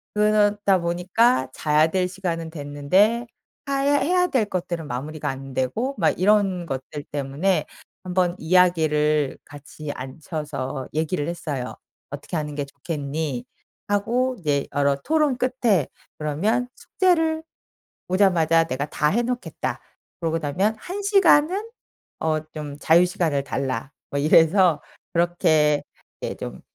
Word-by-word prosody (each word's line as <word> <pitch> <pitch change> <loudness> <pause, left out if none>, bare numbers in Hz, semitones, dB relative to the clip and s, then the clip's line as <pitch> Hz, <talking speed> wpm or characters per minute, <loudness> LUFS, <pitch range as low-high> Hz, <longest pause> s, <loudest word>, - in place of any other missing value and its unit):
그러다 205 -2 +3
보니까 175 - +2
자야 155 +1 +3
될 180 +2 0
시간은 170 -3 -4
됐는데 170 +11 +1 0.4
하야 275 +1 +2
해야 360 +6 +2
될 260 -10 +1
것들은 175 -5 -4
마무리가 145 +5 -5
안되고 135 - -2
막 165 -6 +2
이런 195 -2 +3
것들 135 0 -5
때문에 145 +7 0 0.4
1 180 - -4
번 180 -1 +2
이야기를 155 -4 +2
같이 145 0 -8
앉혀서 140 -1 -5
얘기를 155 0 -1
했어요. 150 -7 -4 0.4
"어떻게 145 +4 -5
하는 150 -1 -4
게 145 - -2
좋겠니?" 140 -2 -4 0.4
하고 240 +5 +1
네 140 -2 +1
여러 140 -1 +3
토론 305 -4 +2
끝에 245 - +1 0.3
그러면 205 +12 0
"숙제를 325 -4 +1 0.7
오자마자 170 -4 +3
내가 140 -2 -2
다 150 - 0
해 235 +8 +1
놓겠다. 245 +1 -3 0.4
그러고 165 -1 0
나면 180 +9 0
1 370 - -5
시간은 390 0 +4 0.5
어 155 -1 +1
좀 150 -2 -6
자유시간을 165 -4 +3
달라." 130 -2 -3 0.2
뭐 140 - -1
이래서 165 +2 +5 0.3
그렇게 155 -4 +2 0.4
예 - - -3
좀 - - -7
165 Hz, 260 characters per minute, -23 LUFS, 145-210 Hz, 0.7 s, 이래서